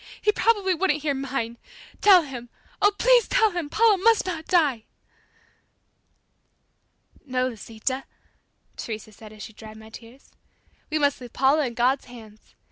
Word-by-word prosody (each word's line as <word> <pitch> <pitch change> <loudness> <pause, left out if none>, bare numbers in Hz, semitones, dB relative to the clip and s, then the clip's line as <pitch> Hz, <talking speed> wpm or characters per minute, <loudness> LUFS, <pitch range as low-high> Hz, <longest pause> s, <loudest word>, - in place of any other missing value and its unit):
He 420 - +2
probably 415 -4 +1
wouldn't 310 -4 0
hear 295 -2 0
mine. 260 -4 -4 0.4
Tell 380 -4 +7
Him! 250 -4 -9 0.3
Oh, 410 0 +5
please - - +4
tell 450 -4 +3
Him, 345 -5 -4
Paula 430 0 +3
must 450 +1 +3
not 330 -4 -5
die!" 290 -11 +2 2.4
"No, 255 -2 -1
Lisita," 235 +3 -5 0.7
Teresa 220 -1 -6
said 215 +1 -14
as 215 -1 -11
she 220 - -10
dried 215 0 -12
my 220 0 -13
tears; 235 +4 -14 0.6
"We 310 - 0
must 285 -2 +1
leave 245 -2 -10
Paula 275 +2 +2
in 235 - -8
God's 255 +3 +1
hands. 220 -3 -15
275 Hz, 145 wpm, -24 LUFS, 235-365 Hz, 2.4 s, Tell